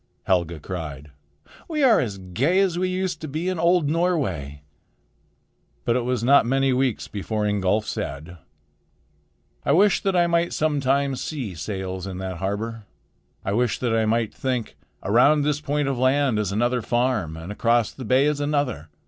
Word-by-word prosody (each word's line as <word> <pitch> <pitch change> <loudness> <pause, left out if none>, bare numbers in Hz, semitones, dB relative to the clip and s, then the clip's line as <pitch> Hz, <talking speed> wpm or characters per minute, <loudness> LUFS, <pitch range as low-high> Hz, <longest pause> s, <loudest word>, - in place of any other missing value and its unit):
Helga 85 -3 0
cried. 75 -4 -7 0.6
"We 305 -3 -1
are 245 -4 +6
as 105 -6 -2
gay 115 - 0
as 190 -3 +2
we 185 0 0
used 185 -3 -2
to 155 - -5
be 155 +5 -3
in 185 -3 -2
old 170 -2 +3
Norway." 130 - -1 1.2
But 120 - +2
it 125 - +1
was 125 -2 -1
not 140 +2 +6
many 135 +2 +1
weeks 130 -2 0
before 105 +1 -3
Ingolf 105 +1 +1
said: 75 +6 -5 1.3
"I 140 - +2
wish 195 +4 +4
that 195 -1 0
I 175 -1 +4
might 170 0 +1
sometime 140 -2 +1
see 130 - -4
sails 95 +2 -5
in 95 -1 -6
that 95 -1 -5
harbor. 105 +4 -4 0.6
I 95 - -1
wish 120 0 +1
that 120 -3 0
I 110 -1 +1
might 115 0 0
think, 125 -4 -3 0.3
'Around 135 +9 +4
this 150 0 0
point 145 -1 -1
of 135 -3 -1
land 130 -3 +2
is 105 -3 -1
another 120 +4 +1
farm, 120 -10 0
and 80 +4 -7
across 115 +1 +1
the 130 - -9
bay 130 +4 +3
is 150 -1 +1
another. 145 - -1
125 Hz, 170 wpm, -23 LUFS, 100-145 Hz, 1.3 s, are